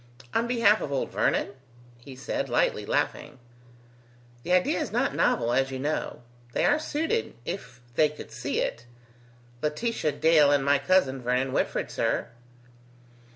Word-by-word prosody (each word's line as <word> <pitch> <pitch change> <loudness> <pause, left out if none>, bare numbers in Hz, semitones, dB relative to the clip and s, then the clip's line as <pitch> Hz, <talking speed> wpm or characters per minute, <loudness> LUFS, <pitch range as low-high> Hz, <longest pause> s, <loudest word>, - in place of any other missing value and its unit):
"On 230 +1 +1
behalf 230 -3 +4
of 140 - -4
old 135 - -2
Vernon?" - - +1 0.5
he 130 +2 -11
said, 130 - -3
lightly - - +1
laughing. - - -1 1.0
"The 175 - -5
idea 180 0 +3
is - - -3
not - - 0
novel, 120 +1 +1
as 135 +1 +2
you 135 - -4
know. 145 -2 -3 0.3
They - - +1
are 295 +1 +3
suited, 325 +9 -2
if 125 -9 -6
they 150 +5 +4
could 150 - -11
see 120 +5 -2
it. 115 +1 -4 0.7
Laetitia 155 +1 -1
Dale 150 -1 +5
and 140 -1 +2
my 140 0 +4
cousin 140 -4 +2
Vernon 125 +2 0
Whitford, - - -1
sir." - - -1
145 Hz, 150 wpm, -27 LUFS, 130-185 Hz, 1.0 s, Dale